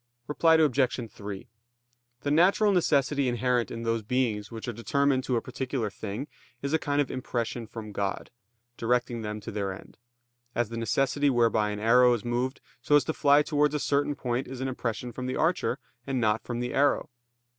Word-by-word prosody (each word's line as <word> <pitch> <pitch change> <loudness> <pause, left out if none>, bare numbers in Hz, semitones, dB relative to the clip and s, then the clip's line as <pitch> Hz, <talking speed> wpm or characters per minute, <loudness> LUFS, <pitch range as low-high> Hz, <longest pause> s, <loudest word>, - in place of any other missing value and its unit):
Reply 160 +4 +4
Obj. 130 -6 +2
3: 100 -1 -7 0.7
The 145 - -1
natural 190 +7 +4
necessity 145 -6 +2
inherent 120 0 +1
in 115 - -6
those 115 0 0
beings 110 -2 -1
which 115 0 -7
are 120 - -2
determined 135 +3 +1
to 125 - 0
a 115 - 0
particular 130 -4 -3
thing, 110 +7 -5 0.4
is 140 +2 -2
a 160 - +3
kind 145 -1 -1
of 145 - +1
impression 120 -2 -3
from 110 -1 -8
God, 100 -1 -3 0.5
directing 120 0 0
them 105 0 -4
to - - -7
their 100 -2 -2
end; 95 - -11 0.6
as 120 -2 0
the 115 - -6
necessity 135 +5 +1
whereby 115 -4 +2
an 105 0 -4
arrow 125 +3 +5
is 115 - -7
moved 125 +3 -1 0.2
so 145 +4 +3
as 145 - +5
to 160 - -2
fly 145 0 +4
towards 150 0 +1
a - - 0
certain 145 +1 +1
point 125 -1 -2
is 130 0 -7
an 130 - -2
impression 120 -2 -3
from 125 +2 -5
the 130 - -2
archer, 165 +3 +1 0.3
and 135 -2 0
not 110 -1 +2
from 120 -1 -4
the 125 0 -3
arrow. 140 -1 +2
125 Hz, 190 wpm, -28 LUFS, 115-140 Hz, 0.7 s, arrow